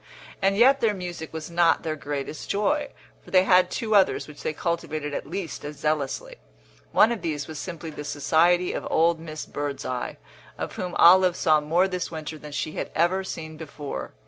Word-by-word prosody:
And 195 0 +2
yet 265 +4 +5
their 215 -3 +2
music 175 -4 -6
was 160 +1 -6
not 170 -1 +3
their 160 -2 -2
greatest 145 0 -5
joy, 285 +8 +1 0.3
for - - -15
they 185 -1 +5
had 185 -1 +5
two 225 -3 -2
others 200 -2 +3
which 150 -1 -12
they - - -1
cultivated 155 -2 -3
at 140 - -4
least 180 -4 -5
as 145 0 -7
zealously. 155 - -2 0.5
One 220 - +5
of 235 - -3
these 150 -4 -3
was 160 -2 -7
simply 170 -3 -6
the 150 - -7
society 170 +5 +2
of - - -4
old 165 +1 +3
Miss 155 -1 -7
Birdseye, 140 -3 -4 0.4
of - - -4
whom 180 -1 -4
Olive 180 +1 +7
saw 155 -1 +3
more 170 +5 +2
this 180 -2 -3
winter 155 -1 -6
than 150 0 -10
she 155 +2 -3
had - - -4
ever 180 +4 +2
seen 160 -4 -7
before. 145 - -6
165 Hz, 190 wpm, -25 LUFS, 150-185 Hz, 0.5 s, Olive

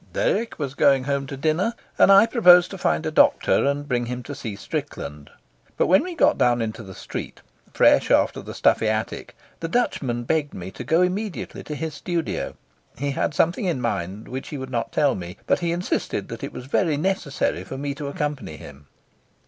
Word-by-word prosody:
Dirk - - 0
was 140 -4 -3
going 135 -2 +4
home 140 0 -1
to 140 -1 -6
dinner, 160 - 0 0.2
and - - +7
I 195 +2 +8
proposed 180 -7 +6
to 195 - -6
find 80 - 0
a - - -1
doctor - - +4
and 145 +1 -1
bring 120 -3 -1
him 125 0 -4
to 145 - -7
see 125 -7 -6
Strickland; 75 -7 -6 0.5
but - - +3
when 185 - +5
we 360 -1 -6
got - - +3
down 120 -1 +3
into 110 0 -3
the 95 -3 -10
street, - - -7 0.3
fresh - - +4
after - - +3
the - - -9
stuffy 110 - +3
attic, 110 0 -3 0.2
the 165 - -3
Dutchman 135 - -1
begged 150 +3 -1
me 90 +1 -7
to - - -8
go 165 +3 +3
immediately 195 +2 -3
to 150 - -5
his 155 +2 -4
studio. 170 +2 -3 0.4
He 140 +3 -1
had 145 - -1
something 175 +6 +1
in 170 -8 0
mind 100 -3 -3
which 130 +1 -6
he 150 - -5
would 130 -1 -7
not 115 -2 -2
tell 145 -3 +2
me, 90 0 -7
but - - +2
he 170 -1 -1
insisted 175 +2 -2
that - - -7
it - - -4
was 125 - -8
very 150 +2 +1
necessary 170 -3 -1
for 135 - -7
me 140 +1 -3
to 140 0 -6
accompany 145 - -4
him. 70 0 -13
140 Hz, 205 wpm, -23 LUFS, 120-170 Hz, 0.5 s, I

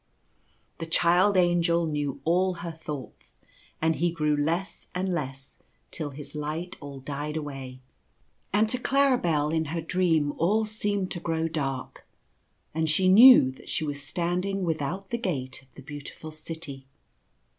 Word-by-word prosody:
The 165 - -4
Child 175 +4 +4
Angel 170 -1 +3
knew 145 -3 -2
all 180 +3 +2
her 170 - -3
thoughts, 150 -4 -9 0.4
and 160 0 +1
he 175 +2 +2
grew 150 -3 +1
less 165 +6 -2
and 185 +1 -1
less 135 -6 -4 0.3
till 155 -3 -4
his 145 +1 -10
light 155 +4 -4
all 140 -1 -8
died 145 +3 -4
away; 135 -4 -6 0.7
and 210 +2 +3
to 250 - -1
Claribel 245 - +2
in 160 0 +1
her 165 +3 -3
dream 165 -3 +1
all 210 +7 +3
seemed 205 -3 -2
to 175 - -3
grow 165 -1 -1
dark, 135 -5 -4 0.7
and 160 0 0
she 185 +4 +3
knew 225 - +9
that 130 - -14
she 155 - -1
was 145 -1 -4
standing 180 +6 -2
without 170 +4 -2
the 235 - -1
gate 130 - -3
of 135 - -24
the 135 - -11
Beau 145 0 -8
tiful 155 +2 -9
City. 155 -4 -8
160 Hz, 155 wpm, -27 LUFS, 145-180 Hz, 0.7 s, knew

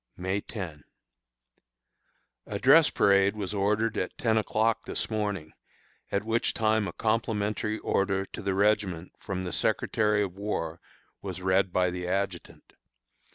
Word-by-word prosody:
May 95 +3 -1
10. 85 -11 -7 1.6
A - - -3
dress - - +6
parade 100 +1 +3
was 105 -1 -3
ordered 105 +3 +1
at - - -3
ten 115 -7 +1
o'clock 110 +1 +1
this - - -2
morning, 105 -7 -2 0.6
at 100 - 0
which 115 +1 0
time 110 -2 +2
a - - -6
complimentary 110 -1 -1
order 95 -2 0
to - - -8
the 100 -1 -1
regiment 100 -4 +1
from 95 -1 -4
the 90 - -4
Secretary 105 -1 +1
of 95 -3 -4
War 90 -5 -3 0.4
was - - -6
read 95 0 +2
by 90 0 +2
the 90 0 -4
adjutant. 95 -1 -4
100 Hz, 140 wpm, -28 LUFS, 95-110 Hz, 1.6 s, dress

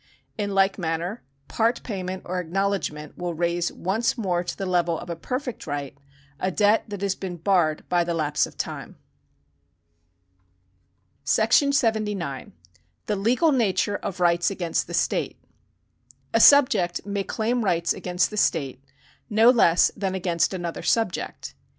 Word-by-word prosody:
In 205 -2 -3
like 195 +1 +2
manner 170 +5 -3 0.3
part 230 +2 0
payment 190 -4 -5
or 180 +1 -2
acknowledgment 180 -4 -3
will 175 -1 -3
raise 170 +1 0
once 220 +8 -1
more 180 -6 -1
to 175 - -5
the 195 - -3
level 175 -2 +1
of 175 - -7
a - - -3
perfect 250 - -5
right 145 -2 -4 0.4
a 185 - 0
debt 205 +3 +2
that 205 -2 -7
has 200 -1 +1
been 185 -2 -6
barred 165 -3 +1
by 175 -1 +2
the 170 0 -2
lapse 150 -2 0
of - - -16
time. - - -5 2.3
§ 230 - +3
79. 210 - -1 0.5
The 210 - -1
Legal 245 - +2
Nature 205 -5 +1
of 195 -2 -6
Rights 175 -1 +3
against 175 -4 -2
the - - -4
State. - - -1 1.0
A 225 - +4
subject 250 -12 +5
may 200 -1 -2
claim 230 +4 -1
rights 170 -4 +1
against 180 +2 -1
the 210 - -6
state, 135 -9 0 0.5
no 225 +2 +6
less 180 -8 +4
than 195 -2 -2
against 170 -3 0
another 175 -3 -4
subject. 225 -6 -1
190 Hz, 145 wpm, -24 LUFS, 170-210 Hz, 2.3 s, no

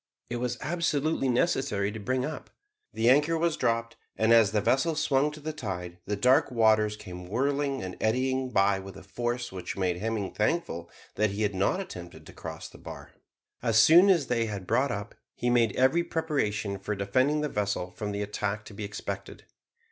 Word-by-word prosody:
It 120 - -1
was 125 0 -2
absolutely 155 -4 0
necessary 120 -6 +1
to 110 - -7
bring 130 +4 -1
up. 150 0 -6 0.4
The 115 - 0
anchor 150 +6 +4
was 170 0 +1
dropped, 115 0 -1 0.2
and 110 +1 +4
as 115 -3 +6
the 105 +1 +1
vessel 135 +9 +2
swung 145 -1 +2
to 150 - -10
the 155 +1 -5
tide 90 - -5
the 105 - 0
dark 125 +6 +4
waters 110 -3 +3
came 90 -3 -9
whirling 140 +4 0
and 95 -1 -6
eddying 130 +3 +1
by 100 -3 +3
with 95 0 -10
a - - -11
force 120 0 -3
which 90 -1 -6
made 90 -2 0
Hemming 105 0 -2
thankful 105 - -1 0.3
that 110 0 +3
he 100 +2 -2
had 105 -1 0
not 95 - +1
attempted 90 - -8
to - - -12
cross - - -7
the - - -15
bar. - - -10 0.5
As 115 -2 +2
soon 170 - +8
as 170 -8 +3
he 115 -2 +1
had 100 -3 -5
brought 135 +9 +2
up, 100 0 -4 0.2
he 120 - 0
made 115 -3 +3
every 130 +7 +3
preparation 110 -13 -1
for 105 +2 -3
defending 130 +10 +1
the 150 - 0
vessel 100 -6 -2
from 105 +3 -5
the 100 0 -2
attack 105 +1 -3
to - - -11
be 105 - -6
expected. 100 0 -6
115 Hz, 195 wpm, -28 LUFS, 100-135 Hz, 0.5 s, soon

